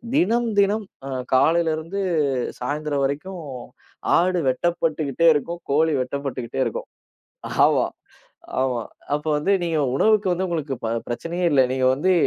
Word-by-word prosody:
தினம் 235 +2 +2
தினம் 205 +2 +2 0.2
அ, - - -5 0.2
காலையிலருந்து 160 +5 +2 0.6
சாயந்திரம் 145 +2 -1
வரைக்கும் 170 +7 -4 0.8
ஆடு 180 +1 +2
வெட்டப்பட்டுகிட்டே 160 +1 0
இருக்கும். 170 +4 -3
கோழி 160 +3 +3
வெட்டப்பட்டுகிட்டே 130 -2 -4
இருக்கும். - - -4 0.8
ஆமா, - - +3 0.8
ஆமா. 125 -3 0 0.3
அப்ப 150 - -8
வந்து 185 +7 +1
நீங்க 165 -2 0 0.2
உணவுக்கு 215 +2 +3
வந்து 185 +2 -1
உங்களுக்குப் 150 -7 -3
ப - - 0 0.2
பிரச்சனையே 170 +9 -2
இல்ல. 135 -2 +6
நீங்க 130 -1 +1
வந்து 180 +8 +2
160 Hz, 120 wpm, -23 LUFS, 140-180 Hz, 0.8 s, இல்ல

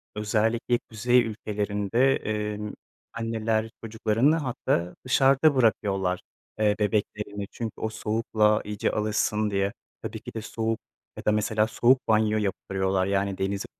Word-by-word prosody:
özellikle 110 +3 +1
kuzey 120 +3 +3
ülkelerinde, 105 +3 0
emm, 105 -1 -3 0.4
anneler 115 -1 -1
çocuklarını 115 +6 +2
hatta 125 - -1
dışarıda 135 +3 +4
bırakıyorlar. 95 -6 +1 0.4
Eee, 105 -1 +3
bebeklerini 105 -1 -1
çünkü 115 -3 -5
o 110 - 0
soğukla 110 -1 +1
iyice 105 -1 -1
alışsın 105 0 0
diye. 100 0 0 0.3
Tabii - - -5
ki - - -10
de 110 - -4
soğuk 115 0 -2 0.4
ya - - -8
da - - +4
mesela 105 +1 +1
soğuk 125 +3 +4
banyo 110 -1 +3
yaptırıyorlar, 95 -2 0
yani, 100 0 0
denize 95 +1 -2
105 Hz, 125 wpm, -26 LUFS, 105-115 Hz, 0.4 s, dışarıda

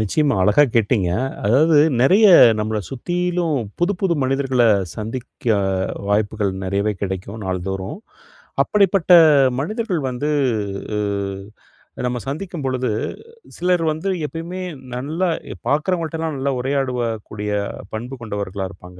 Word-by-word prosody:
நிச்சயமா 145 +8 +1
அழகா 105 +10 +5
கேட்டிங்க 105 -5 +2 0.3
அதாவது, 150 +9 +4 0.2
நெறைய 195 - +6 0.3
நம்மள 110 0 -1
சுத்திலும் 175 +3 -1 0.2
புதுப்புது 180 0 +1
மனிதர்கள 130 -1 +1 0.3
சந்திக்க, 120 +4 -7 0.6
வாய்ப்புகள் 105 -1 0
நெறையவே 100 +3 0
கெடைக்கும் 100 +2 -4
நாள்தோறும். 95 - -4 0.7
அப்படிப்பட்ட 195 -3 +2 0.5
மனிதர்கள் 190 +1 -2
வந்து 125 +4 -3 0.7
உ - - 0 1.1
நம்ம 125 0 -1
சந்திக்கும் 165 +2 -5
பொழுது, 130 -1 -1 0.7
சிலர் 180 -1 +1
வந்து 160 +6 -3 0.2
எப்பயுமே 165 +4 -6 0.4
நல்லா 155 +9 -2 0.4
பாக்குறவங்கள்ட்டலாம், 160 +1 -1
நல்லா 135 +1 -1
உரையாடவக்கூடிய 120 -6 -2 0.4
பண்பு 120 +5 -5
கொண்டவர்களாக 100 -3 -4
இருப்பாங்க. 90 -1 -14
130 Hz, 100 wpm, -20 LUFS, 105-165 Hz, 1.1 s, நெறைய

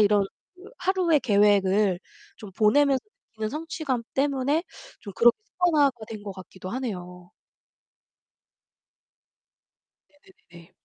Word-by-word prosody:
이런 205 -1 +4 0.3
그 365 +1 -17
하루의 360 -5 +2
계획을 200 -4 +3 0.4
좀 210 - -10
보내면서 265 +7 +3 0.3
느끼는 215 -1 -3
성취감 300 -4 -3
때문에 280 +2 +1 0.4
좀 200 - -9
그렇게 235 +3 +5
습관화가 295 - +2
된 215 -2 -8
것 205 -1 -6
같기도 185 0 -10
하네요. 180 -8 -6 2.8
네네네네. 290 - -19
230 Hz, 240 characters per minute, -25 LUFS, 200-290 Hz, 2.8 s, 그렇게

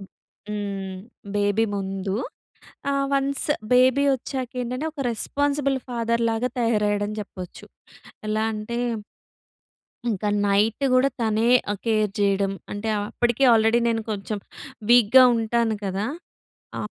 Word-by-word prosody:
హ్మ్. 195 -1 -7 0.4
బేబీ 205 +2 +2
ముందు. 195 0 -3 0.8
ఆహ్, 275 0 +1
వన్స్ 275 0 0 0.3
బేబీ 255 +2 +5
ఒచ్చాక 260 -1 -5
ఏంటంటే 250 +4 -3
ఒక 285 -3 -4
రెస్పాన్సిబుల్ 280 +3 0
ఫాదర్‌ 235 -1 -1
లాగా 225 +3 -1
తయారయ్యాడని 210 -2 0
చెప్పొచ్చు. 185 -3 -10 0.6
ఎలా 215 +1 0
అంటే 215 +2 -4 1.3
ఇంకా 210 -1 -1 0.2
నైట్ 205 +5 +2
కూడా 255 +2 +4
తనే 220 0 +1 0.4
కేర్ 215 -3 +1
చేయడం. 200 -1 +2 0.2
అంటే 205 +2 -4 0.2
అప్పటికే 240 +2 +1
ఆల్రెడీ 225 +1 +4
నేను 225 -1 0
కొంచెం 210 0 -3 0.5
వీక్‌గా 245 +1 +7
ఉంటాను 230 0 +1
కదా! 195 +2 -2 0.7
ఆహ్, - - -5
225 Hz, 110 wpm, -24 LUFS, 205-245 Hz, 1.3 s, వీక్‌గా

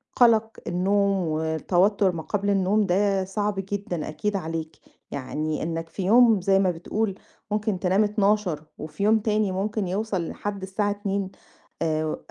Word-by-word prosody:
قلَق 225 -2 +4
النوم 200 +3 +2 0.2
وتوتُّر 175 +6 +2
ما 165 -2 -5
قبل 205 +2 -1
النوم، 200 +2 +2
ده 195 +1 +2
صعب 205 +2 -2 0.2
جدًا 185 -5 -3
أكيد 210 +6 -2
عليك، 160 -3 -4 0.4
يعني 155 +3 -3
إنَّك 165 0 -3
في 190 +3 -5
يوم 225 0 +5
زي 195 +1 +3
ما 185 -2 +3
بتقول 195 +4 -2 0.4
ممكن 210 -2 0
تنام 190 +3 +3
00:00 205 -6 +1
وفي 160 +6 -5
يوم 220 +1 +4
تاني 215 -2 +1
ممكن 200 +1 -2
يوصل 190 -2 -2
لحد 205 -1 -5
الساعة 205 +2 -1
02:00، 200 -2 -2 0.5
آآ، 155 -1 0
195 Hz, 145 wpm, -25 LUFS, 175-210 Hz, 0.5 s, يوم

